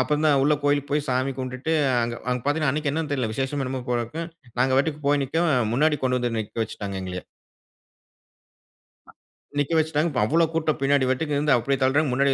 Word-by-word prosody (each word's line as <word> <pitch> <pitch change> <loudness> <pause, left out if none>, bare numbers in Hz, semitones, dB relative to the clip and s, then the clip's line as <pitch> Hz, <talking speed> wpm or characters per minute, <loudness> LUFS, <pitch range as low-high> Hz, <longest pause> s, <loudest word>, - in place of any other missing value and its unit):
அப்பந்தான் 150 +1 +2
உள்ள 150 +2 +4
கோயிலுக்கு 145 0 +1
போய் 150 0 0
சாமி 130 +2 +1
கும்ட்டுட்டு, 130 +5 -2 0.3
அங்க, 120 0 -2
அங்க 125 -1 0
பாத்தீங்கன்னா, 145 -2 +1
அன்னக்கி 150 -1 -1
என்னன்னு 155 -2 -2
தெரில. 125 -6 -1
விசேஷமோ! 135 +2 -2
என்னம்மோ! 130 0 -3
போலருக்கு. 120 +8 -2 0.4
நாங்க 130 +1 +3
வாட்டுக்கு 150 +1 0
போய் 145 -1 +3
நிக்கோம். 165 +5 0 0.2
முன்னாடி 150 +4 +2
கொண்டு 125 0 +2
வந்து 120 -2 -1
நிக்க 110 +1 -5
வச்சுட்டாங்க, 100 -2 -6
எங்களய. 90 -1 -6 1.8
அ - - -14 0.5
நிக்க 145 +3 0
வச்சுட்டாங்க. 160 +1 +1
இப்ப 125 - 0
அவ்ள 165 +8 +3
கூட்டம். 155 -3 0
பின்னாடி 135 -1 +2
வாட்டுக்கு 145 +2 -1
இருந்து 145 -2 +3
அப்பஜடி 135 +3 -1
தள்ளுறாங்க. 140 +1 +2
முன்னாடி 140 +1 +3
140 Hz, 180 wpm, -24 LUFS, 130-150 Hz, 1.8 s, உள்ள